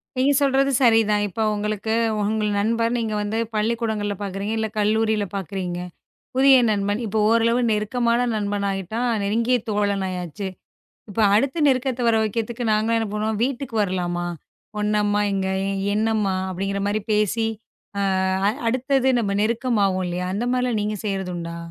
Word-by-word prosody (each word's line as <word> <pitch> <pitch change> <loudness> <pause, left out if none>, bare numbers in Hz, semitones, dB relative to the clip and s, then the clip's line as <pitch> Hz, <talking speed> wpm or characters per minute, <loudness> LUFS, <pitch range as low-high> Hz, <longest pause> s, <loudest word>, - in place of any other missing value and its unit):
நீங்கச் 270 +2 +3
சொல்றது 275 0 +3
சரிதான். 225 -3 +4
இப்போ 220 +4 -3
உங்களுக்கு 210 +1 -2 0.3
உங்கள் 210 0 0
நண்பர் 230 +2 +1
நீங்க 220 -2 -2
வந்து 210 +2 -2 0.2
பள்ளிக்கூடங்கள்ல 215 -2 -1
பாக்குறீங்க. 200 +2 -3
இல்ல 220 0 0
கல்லூரியில 215 0 +1
பாக்குறீங்க. 185 -1 -4 0.6
புதிய 270 0 +7
நண்பன் 205 +1 0
இப்போ 215 +2 -1
ஓரளவு 230 +1 +3
நெருக்கமான 235 +3 +1
நண்பன் 205 -1 -1
ஆயிட்டான். 205 +6 -2
நெருங்கிய 230 +5 +1
தோழன் 200 -2 0
ஆயாச்சு. 180 +2 -5 0.6
இப்போ 220 +3 0
அடுத்த 275 +8 +1
நெருக்கத்தை 255 -1 0
வர 225 - +3
வைக்கறதுக்கு 230 +3 -3
நாங்கள்லாம் 220 +2 +2
என்ன 225 -2 -2
பண்ணுவோம். 215 0 -1
வீட்டுக்கு 265 -2 -4
வரலாமா? 175 -2 -2 0.5
உன்னம்மா 210 0 +1
எங்க 190 -1 -1 0.5
என்னம்மா 215 -3 +1 0.2
அப்படிங்கற 195 +2 -2
மாதிரி 210 +1 0
பேசி. 215 +2 +1 0.5
அ, - - 0 0.7
அடுத்தது 260 +2 +1
நம்ம 205 -4 0
நெருக்கமாவும் 215 -4 +1
இல்லயா, 180 +1 -3
அந்த 220 - -1
மாதிரி 250 0 +1
எல்லாம் 225 -4 0
நீங்க 210 0 -2
செய்யறது 195 -3 -2
உண்டா? 170 0 -5
215 Hz, 140 wpm, -23 LUFS, 200-230 Hz, 0.7 s, புதிய